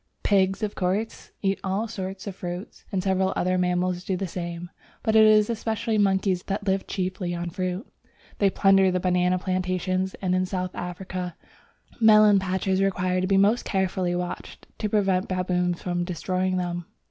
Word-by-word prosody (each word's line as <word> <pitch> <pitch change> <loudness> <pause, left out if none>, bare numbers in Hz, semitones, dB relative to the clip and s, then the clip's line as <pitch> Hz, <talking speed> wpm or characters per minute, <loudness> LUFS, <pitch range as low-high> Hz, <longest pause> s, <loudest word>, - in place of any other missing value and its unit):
Pigs, 195 +1 +2
of 210 - -1
course, 195 +5 -2
eat 195 0 +1
all 195 +4 -1
sorts 190 -3 -6
of 200 -3 -5
fruit, 180 +1 -7
and 190 -3 -1
several 190 -1 +1
other 185 +1 +1
mammals 180 0 0
do 185 0 -1
the 195 - -2
same, 175 0 -6 0.3
but 220 -1 +1
it 220 - +8
is 215 -1 +5
especially 225 -1 -1
monkeys 190 -2 +2
that 200 +2 -4
live 195 -1 0
chiefly 185 -2 -2
on 170 0 -4
fruit. 185 - -3 0.5
They 200 - +4
plunder 195 0 +4
the 185 0 0
banana 180 0 +2
plantations, 185 0 -1
and 185 -2 -1
in 185 0 +1
South 185 -1 -3
Africa 180 0 -5 0.6
melon 215 -2 +7
patches 190 0 0
require 185 -1 +1
to 185 - 0
be 195 0 +3
most 205 +5 +3
carefully 185 -2 0
watched 180 0 -5
to 210 - -1
prevent 195 -3 +1
baboons 180 -1 -1
from 175 -1 -1
destroying 185 +1 -1
them. 175 -1 -3
185 Hz, 170 wpm, -25 LUFS, 180-195 Hz, 0.6 s, it